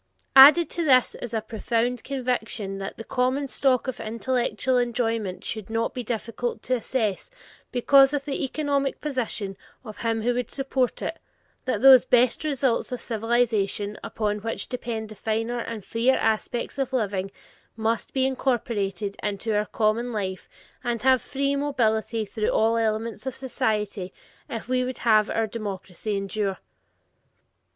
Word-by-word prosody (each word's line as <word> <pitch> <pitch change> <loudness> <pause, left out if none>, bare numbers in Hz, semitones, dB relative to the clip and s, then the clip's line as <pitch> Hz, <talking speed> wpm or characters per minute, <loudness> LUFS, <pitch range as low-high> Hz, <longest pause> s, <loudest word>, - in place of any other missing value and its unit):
Added 295 +5 +9
to 340 - -2
this 255 -5 +4
is 240 - -7
a 225 -2 -1
profound 230 +2 -1
conviction 235 -7 -2
that 195 - -6
the 225 - -6
common 255 +4 0
stock 265 -1 +1
of 260 - -4
intellectual 250 +2 0
enjoyment 230 -5 -1
should 215 -3 -4
not 225 +1 -1
be 250 - -4
difficult 230 0 -4
of 255 - +4
access 225 - -2 0.4
because 270 +2 +5
of 290 -1 -2
the 280 -2 -2
economic 280 0 -1
position 230 -8 -2 0.3
of 215 -2 -9
him 225 -1 -1
who 245 +1 +2
would 245 +1 -3
approach 270 -2 0
it, - - -4 0.5
that 255 - -1
those 265 -2 +9
"best 250 +1 +3
results 270 -6 0
of 250 - -3
civilization" 220 -3 0
upon 210 -1 -2
which 225 +2 -3
depend 230 -3 -4
the - - -8
finer 225 +3 -2
and 225 -4 -5
freer 240 +3 +2
aspects 225 +4 -1
of 265 -1 -1
living 200 -5 -1 0.5
must 225 0 -1
be 265 -1 +1
incorporated 220 -6 -1
into 210 +2 -2
our 210 0 +1
common 230 +3 0
life 190 -4 -4 0.3
and 240 -2 -2
have 260 -2 +5
free 280 +1 -1
mobility 230 -6 0
through 215 +1 -2
all 225 +1 +3
elements 220 +1 -1
of 265 - -3
society 210 -7 -2 0.4
if 230 -1 -5
we 255 0 +1
would 255 0 -4
have 215 -2 +3
our 225 - +1
democracy 205 -2 -4
endure. 195 0 -2
230 Hz, 150 wpm, -25 LUFS, 215-255 Hz, 0.5 s, Added